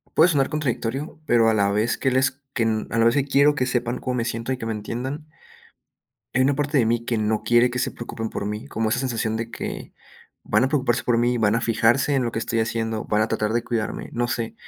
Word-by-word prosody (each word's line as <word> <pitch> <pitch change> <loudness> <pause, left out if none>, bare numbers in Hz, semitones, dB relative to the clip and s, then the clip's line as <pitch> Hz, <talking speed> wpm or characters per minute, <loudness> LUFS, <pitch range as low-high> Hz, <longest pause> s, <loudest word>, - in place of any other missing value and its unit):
puede 160 +3 +6
sonar 140 -6 +2
contradictorio, 145 0 -3
pero 115 -4 +4
a 110 - +3
la 100 -2 +2
vez 105 +4 +1
que 135 - 0
les 130 +1 +1
que 115 - 0
n 110 -1 0
a 115 - -1
la 115 - +4
vez 115 0 +4
que 140 -2 +2
quiero 140 +1 +4
que 130 -3 0
sepan 125 -1 -1
cómo 125 - -2
me 120 -2 0
siento 115 +2 -3
y - - -1
que 115 - -6
me 115 - -1
entiendan 125 +8 -5 1.1
hay 130 - +3
una 140 +2 +3
parte 145 +1 0
de 115 - +3
mí 115 0 0
que 115 -1 -1
no 110 0 0
quiere 120 +1 +4
que 125 0 -2
se - - 0
preocupen 115 -1 -6
por 100 - -4
mí, 105 +6 -5
como 115 -5 -1
esa 125 +3 0
sensación 115 -4 -1
de 115 +1 -4
que, - - -6 0.5
van - - +2
a - - +2
preocuparse 130 -5 +1
por 120 -1 +1
mí, 120 +1 +1
van 110 0 +3
a 115 - 0
fijarse 120 +4 +2
en 135 - +2
lo 115 - -1
que 115 - -3
estoy 115 0 -1
haciendo, 110 -1 -2
van 105 +1 +1
a 110 - 0
tratar 110 -1 -1
de 120 0 0
cuidarme, 115 -3 -3
no 120 0 -1
sé, 115 -2 -3
120 Hz, 260 wpm, -23 LUFS, 115-130 Hz, 1.1 s, puede